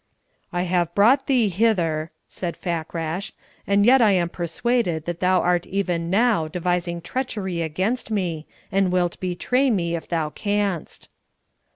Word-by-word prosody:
"I 175 Hz, -1 st, -1 dB
have 175 Hz, -1 st, 0 dB
brought 225 Hz, +7 st, +4 dB
thee 250 Hz, -5 st, +3 dB
hither," 170 Hz, -6 st, +1 dB, 0.2 s
said 175 Hz, -2 st, -5 dB
Fakrash, 170 Hz, +1 st, -3 dB, 0.4 s
"and 200 Hz, 0 st, +3 dB
yet 260 Hz, +2 st, +6 dB
I 215 Hz, -3 st, +5 dB
am 175 Hz, -2 st, +1 dB
persuaded 175 Hz, 0 st, -1 dB
that 175 Hz, -1 st, -4 dB
thou 185 Hz, 0 st, +3 dB
art 175 Hz, -1 st, +1 dB
even 180 Hz, -4 st, -1 dB
now 205 Hz, -4 st, +2 dB
devising 175 Hz, +1 st, -2 dB
treachery 190 Hz, -4 st, -3 dB
against 185 Hz, +11 st, -1 dB
me, 175 Hz, -7 st, -2 dB, 0.2 s
and 195 Hz, -1 st, +2 dB
wilt 180 Hz, -1 st, 0 dB
betray 250 Hz, +9 st, +1 dB
me 170 Hz, -7 st, 0 dB
if 165 Hz, -, -6 dB
thou 160 Hz, -3 st, -1 dB
canst." 205 Hz, -4 st, -2 dB
180 Hz, 145 wpm, -23 LUFS, 170-205 Hz, 0.4 s, yet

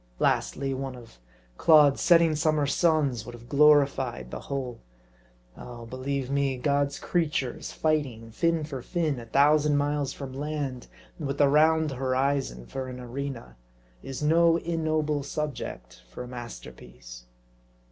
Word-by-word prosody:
Lastly, 135 Hz, -, 0 dB
one 135 Hz, 0 st, -4 dB
of 115 Hz, -, -14 dB, 0.4 s
Claude's 150 Hz, -3 st, +6 dB
setting 170 Hz, -2 st, +5 dB
summer 155 Hz, -1 st, +1 dB
suns 140 Hz, -5 st, +1 dB
would 120 Hz, +1 st, -9 dB
have 120 Hz, 0 st, -14 dB
glorified 140 Hz, -, +3 dB
the -, -, -5 dB
whole. 130 Hz, -3 st, -5 dB, 0.8 s
Oh, 120 Hz, -1 st, -10 dB
believe 130 Hz, +2 st, -4 dB
me, 140 Hz, -2 st, 0 dB
God's 140 Hz, +2 st, 0 dB
creatures 150 Hz, -7 st, -2 dB
fighting, 135 Hz, -8 st, -1 dB
fin 165 Hz, +5 st, 0 dB
for 140 Hz, -4 st, -6 dB
fin, 155 Hz, -3 st, -1 dB
a 115 Hz, -, -10 dB
thousand 150 Hz, +2 st, +4 dB
miles 145 Hz, -1 st, 0 dB
from 135 Hz, -2 st, -8 dB
land, 140 Hz, -3 st, -4 dB, 0.3 s
and 150 Hz, -, -3 dB
with 140 Hz, 0 st, -3 dB
the 145 Hz, -, +5 dB
round 155 Hz, +1 st, +3 dB
horizon 130 Hz, -, -1 dB
for 130 Hz, -, -5 dB
an 125 Hz, 0 st, -7 dB
arena, 125 Hz, -, -6 dB, 0.4 s
is 135 Hz, +2 st, -6 dB
no 165 Hz, +2 st, +4 dB
ignoble 155 Hz, -3 st, -1 dB
subject 135 Hz, -, -5 dB
for -, -, -7 dB
a -, -, -9 dB
masterpiece. -, -, -10 dB
140 Hz, 135 wpm, -27 LUFS, 125-150 Hz, 0.8 s, Claude's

